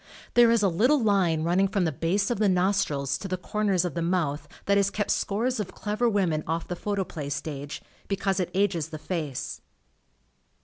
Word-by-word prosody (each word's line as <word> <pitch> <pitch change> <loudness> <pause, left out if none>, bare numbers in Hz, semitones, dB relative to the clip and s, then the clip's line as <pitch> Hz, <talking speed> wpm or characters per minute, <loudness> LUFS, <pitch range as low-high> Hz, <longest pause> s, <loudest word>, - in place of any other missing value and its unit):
There 240 -1 +6
is 230 -2 +3
a - - +5
little 240 - +3
line 190 -8 +2
running 180 +4 +3
from 195 -1 0
the 160 - +1
base 185 - 0
of 235 - -1
the 210 -2 +3
nostrils 180 -7 +1
to 195 - -5
the 185 -1 -2
corners 195 -1 0
of 175 - -3
the 170 - -2
mouth 165 -4 -1 0.2
that 200 - +3
has 200 -1 +3
kept 205 +1 -1
scores 230 +5 0
of 210 - -4
clever 215 +3 0
women 180 -8 +1
off 165 +1 -2
the 180 - -3
Photoplay 185 -7 -3
stage, 145 0 -5 0.2
because 195 -1 0
it 180 - -1
ages 180 -5 +1
the 155 - -6
face. 155 -5 -4
185 Hz, 190 wpm, -27 LUFS, 165-205 Hz, 0.2 s, There